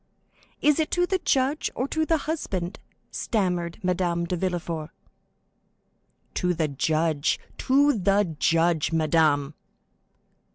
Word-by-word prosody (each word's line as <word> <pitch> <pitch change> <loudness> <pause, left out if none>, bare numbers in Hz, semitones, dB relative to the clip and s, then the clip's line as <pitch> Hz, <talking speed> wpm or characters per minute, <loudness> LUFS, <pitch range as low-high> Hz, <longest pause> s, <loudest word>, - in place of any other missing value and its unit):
"Is 300 +1 +4
it 310 - +1
to 355 0 +3
the 375 +1 0
judge 275 0 +1
or 255 - -1
to 315 0 0
the 325 - +3
husband?" 195 - -3 0.3
stammered 180 -5 -1
Madame 175 -1 0
de 180 - -2
Villefort. 170 -3 -3 1.4
"To 180 -1 0
the 160 -1 0
judge—to 160 - +1
the 195 -3 +1
judge, 165 -1 +2
madame!" 155 -2 +2
175 Hz, 110 wpm, -25 LUFS, 165-260 Hz, 1.4 s, Is